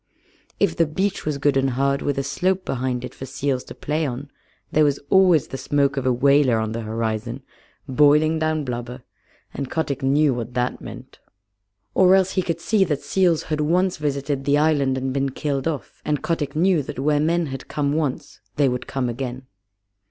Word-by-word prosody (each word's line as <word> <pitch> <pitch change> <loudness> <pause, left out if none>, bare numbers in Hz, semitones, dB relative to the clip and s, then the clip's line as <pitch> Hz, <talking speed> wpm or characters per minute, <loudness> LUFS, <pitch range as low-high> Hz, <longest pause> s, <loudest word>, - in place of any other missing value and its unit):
If 185 -5 +2
the 165 -2 +2
beach 190 +3 -2
was 150 -2 0
good 140 0 +1
and 135 0 +2
hard, 140 +1 +1
with 145 -1 -1
a 135 - 0
slope 185 +7 -1
behind 125 -1 -2
it - - -9
for 135 - -8
seals 130 0 -2
to - - -10
play 155 +2 -2
on, 140 0 -4 0.4
there 155 - +4
was 145 -2 +2
always 180 -6 +5
the 135 - -5
smoke 140 -1 +1
of 135 -2 -1
a - - +4
whaler 140 -1 +4
on 110 0 -1
the 115 +1 -3
horizon, 115 +3 -3 0.4
boiling 150 +3 +4
down 155 -1 0
blubber, 125 0 -5 0.5
and 140 -2 -4
Kotick 145 -4 -2
knew 140 +1 +3
what 120 +1 -5
that 125 0 -1
meant. - - -10 0.7
Or 190 0 +6
else 190 -1 +2
he 190 - +1
could 170 -2 -3
see 210 +2 +3
that 145 -4 -2
seals 170 +2 +2
had 155 -1 -2
once 180 +4 +1
visited 140 -1 -2
the 145 +1 +3
island 145 -4 +2
and 130 0 -2
been 135 0 0
killed 140 +1 -2
off, 150 -6 -5
and 150 -2 -1
Kotick 165 -4 -2
knew 175 0 +3
that 135 - -7
where 145 +2 +2
men 165 +3 +1
had 135 - -7
come 145 -1 -1
once 150 -4 -3 0.2
they 145 -2 +3
would 125 0 -2
come 135 -2 -2
again. 125 +1 -5
140 Hz, 195 wpm, -22 LUFS, 130-155 Hz, 0.7 s, Or